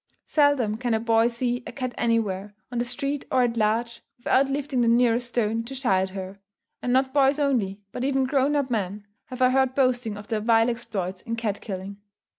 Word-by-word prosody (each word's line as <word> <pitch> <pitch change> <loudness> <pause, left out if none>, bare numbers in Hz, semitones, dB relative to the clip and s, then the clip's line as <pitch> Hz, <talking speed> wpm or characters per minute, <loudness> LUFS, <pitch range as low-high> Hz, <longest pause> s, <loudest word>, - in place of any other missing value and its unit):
_ - - -67 0.2
Seldom 285 -8 +2
can 240 -1 0
a - - +1
boy 225 0 +3
see 245 +1 -2
a - - -5
cat 255 -2 -4
anywhere, 210 -4 -1 0.2
on 240 - -2
the - - +1
street 275 +3 -3
or 255 - +4
at 240 -1 0
large, 230 +2 0 0.2
without 270 +1 +2
lifting 275 -2 -1
the 235 - +2
nearest 240 0 +3
stone 230 -1 0
to 270 +3 -7
shy 235 -8 +2
at 190 - -2
her. 190 +1 -7 0.4
And 245 - -1
not 265 +1 +2
boys 275 0 +4
only, 230 -9 0
but 250 - -4
even 270 0 +1
grown 275 +2 +1
up 280 -3 0
men, 205 -2 -2 0.2
have 255 0 -3
I 255 - +5
heard 265 0 +2
boasting 245 -5 +1
of 205 0 -10
their 220 -2 -1
vile 225 +1 +3
exploits 195 -6 -4
in 230 - -4
cat 220 -3 -3
killing. 195 0 -6
240 Hz, 215 wpm, -25 LUFS, 215-260 Hz, 0.4 s, I